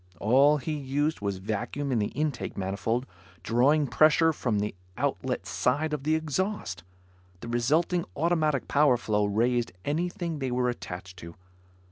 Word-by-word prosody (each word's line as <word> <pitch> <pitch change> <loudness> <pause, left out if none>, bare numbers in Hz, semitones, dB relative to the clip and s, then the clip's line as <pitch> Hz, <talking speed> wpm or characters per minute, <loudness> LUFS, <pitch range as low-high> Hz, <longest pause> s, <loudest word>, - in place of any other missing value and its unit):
All 135 +8 +5
he 155 +3 -4
used 145 +1 -1
was 100 -2 -2
vacuum 110 +8 -3
in 120 - +2
the 105 - +1
intake 150 -3 -3
manifold, 105 +6 -1 0.4
drawing 135 +8 +3
pressure 155 +5 +4
from 120 -7 -1
the 105 +1 -1 0.2
outlet - - -2
side 150 +5 0
of 145 -2 -3
the 155 +1 +3
exhaust. 160 - -2 0.6
The - - -7
resulting 155 +9 +1
automatic 155 -4 +1
power 145 -3 +4
flow 105 -3 0
raised 120 +4 +1
anything 170 +1 -2
they 135 -2 -2
were 125 0 +1
attached 90 -5 -7
to. 85 0 -10
135 Hz, 145 wpm, -28 LUFS, 110-155 Hz, 0.6 s, All